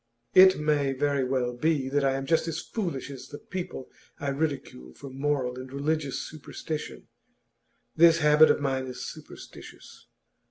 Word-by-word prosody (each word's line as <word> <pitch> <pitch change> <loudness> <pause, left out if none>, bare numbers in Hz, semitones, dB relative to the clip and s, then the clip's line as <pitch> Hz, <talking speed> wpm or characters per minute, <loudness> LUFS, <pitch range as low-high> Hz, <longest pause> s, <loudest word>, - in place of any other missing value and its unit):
It 190 0 +8
may 145 -3 +1
very 140 0 0
well 125 -1 -1
be 140 +1 0
that 145 +1 +1
I 135 -1 +2
am 135 0 -3
just 165 +3 +1
as 165 0 -3
foolish 170 - -4
as 130 -2 -9
the 145 - -9
people 175 -8 -7 0.3
I 140 - -2
ridicule 135 - -4
for 140 -1 -10
moral 135 -2 -1
and 130 0 -9
religious 145 0 -2
superstition. 155 0 -7 0.9
This 165 0 +6
habit 150 0 +6
of - - +3
mine 135 -2 -1
is 125 -1 -7
superstitious. - - -12
140 Hz, 155 wpm, -27 LUFS, 130-155 Hz, 0.9 s, It